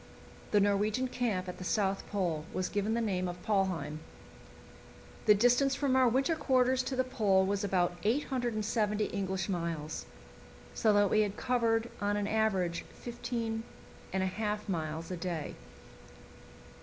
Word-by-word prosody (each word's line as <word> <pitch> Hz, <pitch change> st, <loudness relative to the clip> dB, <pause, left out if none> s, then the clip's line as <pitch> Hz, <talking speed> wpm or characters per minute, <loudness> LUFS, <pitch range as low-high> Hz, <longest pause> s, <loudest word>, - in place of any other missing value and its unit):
The 210 Hz, -, +4 dB
Norwegian 205 Hz, +5 st, +2 dB
camp 215 Hz, -8 st, -1 dB
at 180 Hz, -, -6 dB
the -, -, -5 dB
South 195 Hz, 0 st, 0 dB
Pole 175 Hz, -7 st, -1 dB
was 185 Hz, -1 st, -1 dB
given 205 Hz, +2 st, 0 dB
the 235 Hz, -, +1 dB
name 185 Hz, -5 st, 0 dB
of 175 Hz, 0 st, -5 dB
"Polheim." 180 Hz, -8 st, 0 dB, 1.3 s
The 210 Hz, -, +8 dB
distance 245 Hz, +5 st, +4 dB
from 275 Hz, -2 st, +1 dB
our 260 Hz, -2 st, +5 dB
winter 270 Hz, +7 st, +2 dB
quarters 260 Hz, -3 st, +2 dB
to 265 Hz, -, -2 dB
the 255 Hz, -, +2 dB
Pole 205 Hz, -7 st, +2 dB
was 200 Hz, +1 st, -1 dB
about 180 Hz, -3 st, +1 dB
870 215 Hz, -3 st, 0 dB
English 190 Hz, -2 st, -2 dB
miles, 165 Hz, -5 st, -3 dB, 0.7 s
so 220 Hz, -, +3 dB
that 205 Hz, -1 st, +4 dB
we 215 Hz, -, +4 dB
had 205 Hz, -1 st, -1 dB
covered 235 Hz, -2 st, +1 dB
on 205 Hz, 0 st, +1 dB
an 205 Hz, -, 0 dB
average 195 Hz, -6 st, +1 dB
15 230 Hz, -2 st, -3 dB, 0.5 s
1/2 210 Hz, +3 st, -1 dB
miles 160 Hz, -2 st, -3 dB
a 180 Hz, -, -3 dB
day. 170 Hz, -4 st, -3 dB
205 Hz, 145 wpm, -31 LUFS, 185-235 Hz, 1.3 s, The